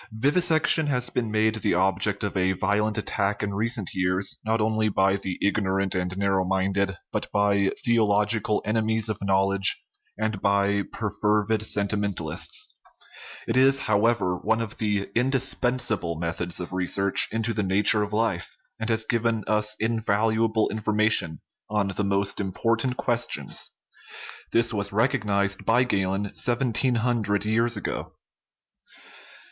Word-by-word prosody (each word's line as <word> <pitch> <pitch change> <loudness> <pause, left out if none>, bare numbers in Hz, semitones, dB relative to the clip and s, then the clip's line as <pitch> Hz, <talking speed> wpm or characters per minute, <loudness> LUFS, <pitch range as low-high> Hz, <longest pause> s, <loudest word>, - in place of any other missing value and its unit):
Vivisection 155 +6 +2
has 125 -3 +1
been 115 -3 -1
made 110 0 +2
the - - +1
object 95 +3 +1
of 100 - -3
a 95 0 +1
violent 105 +3 0
attack 105 -1 -1
in 100 -1 -2
recent 110 -1 -1
years, 90 +1 0
not 110 +1 0
only 110 0 +1
by 95 -1 +2
the 95 -2 -4
ignorant 95 -2 +1
and 90 0 -3
narrow 95 -1 +1
minded, 95 0 -1
but - - -3
by 100 -1 +2
theological 105 -2 +2
enemies 110 0 0
of 105 -1 -4
knowledge 95 0 +2 0.4
and 110 -2 -2
by 100 0 +2
perfervid 105 0 0
sentimentalists; 100 -6 -2 0.7
it 115 - -1
is, 135 +1 +4
however, 105 -3 +1
one 110 +5 0
of 115 +1 -5
the 105 -2 0
indispensa 125 -2 0
ble" 85 -1 -3
methods 85 +1 -2
of 90 0 -6
research 95 +2 +1
into 115 +1 -1
the 105 - -1
nature 105 +2 +2
of 105 0 -3
life, 105 -5 -2 0.2
and 110 +1 -3
has 110 -1 +1
given 115 -2 0
us 105 0 0
invaluable 110 0 +1
information 110 -6 +1 0.3
on 105 -2 0
the 95 +2 -2
most 100 0 0
impor 105 +4 0
tant 125 +3 -2
questions. 120 - -1 0.8
This 115 0 +1
was 100 -1 -1
recognized 100 -4 0
by 120 +3 +3
Galen 100 -3 -1
seven 120 0 0
teen 125 +2 +2
hundred 110 -3 0
years 115 +1 +1
ago. 105 - -5
105 Hz, 140 wpm, -25 LUFS, 100-115 Hz, 0.8 s, is